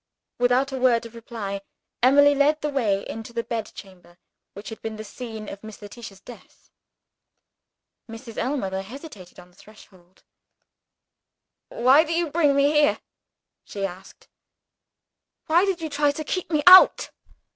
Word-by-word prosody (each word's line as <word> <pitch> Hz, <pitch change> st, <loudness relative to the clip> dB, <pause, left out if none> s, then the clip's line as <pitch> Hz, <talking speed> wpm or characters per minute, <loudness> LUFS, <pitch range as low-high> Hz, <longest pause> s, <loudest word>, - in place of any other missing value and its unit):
Without 250 Hz, +3 st, +2 dB
a 265 Hz, -, -4 dB
word 245 Hz, -2 st, +2 dB
of 230 Hz, -, -11 dB
reply, 220 Hz, -4 st, -7 dB, 0.4 s
Emily 285 Hz, +3 st, +5 dB
led 295 Hz, +2 st, +2 dB
the 300 Hz, -, -2 dB
way 210 Hz, -8 st, -1 dB
into 225 Hz, +1 st, -8 dB
the 235 Hz, -1 st, -3 dB
bedchamber 195 Hz, -6 st, -8 dB, 0.4 s
which 200 Hz, +2 st, -9 dB
had 225 Hz, -, -10 dB
been 220 Hz, -1 st, -6 dB
the 215 Hz, -, -8 dB
scene 220 Hz, -1 st, -9 dB
of 200 Hz, -, -9 dB
Miss 215 Hz, -1 st, -11 dB
Letitia's 205 Hz, -1 st, -11 dB
death. 240 Hz, +4 st, -16 dB, 1.4 s
Mrs. 225 Hz, 0 st, -10 dB
Ellmother 195 Hz, -9 st, -2 dB
hesitated 215 Hz, -, -12 dB
on 180 Hz, -, -16 dB
the -, -, -28 dB
threshold. 190 Hz, -3 st, -20 dB, 1.5 s
"Why 265 Hz, +6 st, +4 dB
do 330 Hz, +1 st, -4 dB
you 335 Hz, -3 st, -1 dB
bring 295 Hz, -3 st, +2 dB
me 280 Hz, +1 st, +3 dB
in -, -, -3 dB
here?" 295 Hz, 0 st, +3 dB, 0.6 s
she 200 Hz, -1 st, -5 dB
asked. 190 Hz, 0 st, -11 dB, 1.2 s
"Why 340 Hz, +4 st, +3 dB
did 380 Hz, -4 st, -2 dB
you 320 Hz, -, -4 dB
try 290 Hz, 0 st, +1 dB
to 290 Hz, +2 st, -4 dB
keep 365 Hz, +3 st, -4 dB
me 305 Hz, -3 st, 0 dB
out?" 370 Hz, +1 st, +7 dB
235 Hz, 150 wpm, -23 LUFS, 205-290 Hz, 1.5 s, out